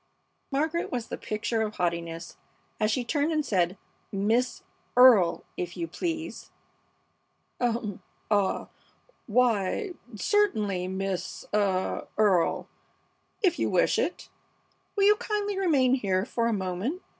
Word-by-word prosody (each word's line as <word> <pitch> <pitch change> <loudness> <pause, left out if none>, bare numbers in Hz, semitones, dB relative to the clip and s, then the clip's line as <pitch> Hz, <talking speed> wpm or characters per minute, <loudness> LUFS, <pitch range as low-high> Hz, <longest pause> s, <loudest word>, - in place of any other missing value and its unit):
Margaret 315 +5 -1
was 240 -3 -3
the - - -3
picture 225 +1 -2
of 215 -1 -2
haughtiness 170 -1 -3 0.4
as 215 - +2
she 245 +3 0
turned 290 +5 +1
and 305 -2 0
said, 185 -4 +1 0.3
"Miss 220 +6 0 0.3
Earle, 235 -9 +7
if 175 0 -4
you 170 -1 -2
please!" 325 - -4 1.1
"Um! 230 -5 -1 0.3
Ah! 200 -2 +1 0.6
Why, 240 - +1 0.2
certainly, 210 - +1
Miss 190 0 -3
ah 195 -3 0
Earle, 195 -6 +3 0.8
if 355 -3 +3
you - - +1
wish - - +3
it. - - -2 0.7
Will 400 - +2
you 415 +1 +7
kindly 420 -3 -2
remain 280 -9 +3
here 195 -7 +1
for 230 -1 0
a - - +1
moment? 195 - -2
220 Hz, 120 wpm, -27 LUFS, 190-290 Hz, 1.1 s, Earle